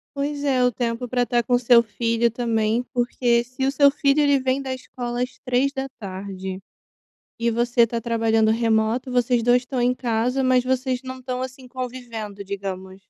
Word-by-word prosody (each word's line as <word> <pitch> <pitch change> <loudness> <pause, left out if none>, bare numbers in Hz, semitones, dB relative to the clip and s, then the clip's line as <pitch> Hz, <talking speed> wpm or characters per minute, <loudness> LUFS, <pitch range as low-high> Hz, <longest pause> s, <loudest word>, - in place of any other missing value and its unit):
Pois 285 +1 -2
é. 265 -3 +2
O 250 - +3
tempo 240 +1 -2
pra 245 0 +1
estar 240 0 +1
com 245 -1 +2
seu 240 -1 +6
filho, 230 +1 0
também, 230 0 0
porque 240 -1 +1
se 255 +2 -3
o 270 - +2
seu 280 0 +5
filho, 280 0 +2
ele 285 -2 +4
vem 260 +1 0
da 265 -1 -3
escola 245 -1 -4
às 250 - -7
15h 200 -8 -3 0.8
e 235 0 +1
você 235 0 +3
tá 230 +1 -3
trabalhando 225 -1 +2
remoto, 225 +2 +1
vocês 245 -1 +2
2 245 +1 +4
estão 250 0 -3
em 250 +1 +2
casa 245 +2 0
mas 255 -1 +3
vocês 260 0 0
não 260 0 -7
estão, 255 0 -4
assim, 260 0 -7
convivendo, 235 -5 -6
digamos. 190 -1 -6
245 Hz, 175 wpm, -23 LUFS, 230-255 Hz, 0.8 s, seu